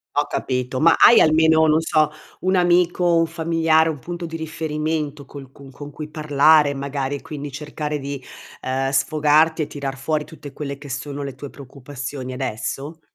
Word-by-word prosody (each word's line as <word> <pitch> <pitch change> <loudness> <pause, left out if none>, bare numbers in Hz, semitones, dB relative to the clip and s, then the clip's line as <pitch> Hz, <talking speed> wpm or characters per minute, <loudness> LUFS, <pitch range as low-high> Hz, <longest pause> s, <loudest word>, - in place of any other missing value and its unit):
Ho - - +1
capito, 130 0 -2
ma 165 0 +6
hai 235 - +8
almeno, 160 0 +4
non 155 +1 +4
so, 155 -2 +1 0.3
un 185 +1 +1
amico, 175 0 +3
un 165 0 +3
familiare, 165 -1 +2
un 155 -3 -3
punto 175 +5 -6
di 165 - -7
riferimento 155 -2 -3
col 135 -1 -12
cun 140 -1 -14
con 145 +2 -9
cui 150 +1 -8
parlare, 150 -1 +4
magari, 140 0 -3
e 140 - -7
quindi 145 -1 -7
cercare 150 +1 -5
di, 140 -1 -6 0.4
ehm, 135 +1 -1
sfogarti 155 +3 +2
e 150 - -2
tirar 140 -2 -5
fuori 150 +2 -2
tutte 150 -3 -11
quelle 140 0 -6
che 145 0 -11
sono 140 +2 -5
le 140 -1 -5
tue 140 +2 -8
preoccupazioni 135 -1 -8
adesso? 135 +5 -5
150 Hz, 175 wpm, -21 LUFS, 140-160 Hz, 0.4 s, hai